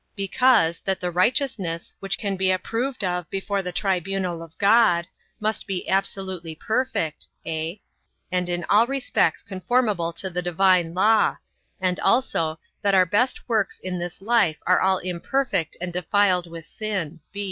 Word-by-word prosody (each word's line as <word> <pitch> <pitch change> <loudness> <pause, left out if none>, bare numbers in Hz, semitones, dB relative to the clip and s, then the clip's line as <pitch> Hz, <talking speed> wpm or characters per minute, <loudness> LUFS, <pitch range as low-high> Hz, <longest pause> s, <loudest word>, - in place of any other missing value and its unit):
Because, 200 -4 +3
that 190 -1 -1
the 180 -1 -2
righteousness, 185 - 0
which 195 0 -2
can 200 -2 -2
be 190 0 +1
approved 230 +7 -1
of 180 -3 -2
before 195 +1 -2
the 180 -1 -5
tribunal 190 -2 -1
of 165 -1 -12
God, 200 -5 +4 0.3
must 215 0 -1
be 190 -2 -4
absolutely 190 -3 -1
perfect, 220 -6 -2 0.2
(a) 165 +4 -4 0.5
and 180 -1 0
in 175 0 -1
all 215 +6 +4
respects 275 0 0
conformable 200 -3 0
to 185 +3 -3
the 180 +1 -2
divine 175 -1 +2
law; 215 +4 +3 0.4
and 185 -1 0
also, 165 -11 +1 0.2
that 200 -1 +3
our 185 -1 +6
best 210 +8 0
works 220 -4 0
in 180 -1 -4
this 175 +2 -6
life 210 -8 +3
are 180 - +4
all 190 0 +3
imperfect 180 - -2
and 175 0 -4
defiled 180 0 +2
with 165 -1 -9
sin. 185 -5 -4
185 Hz, 150 wpm, -24 LUFS, 175-210 Hz, 0.5 s, our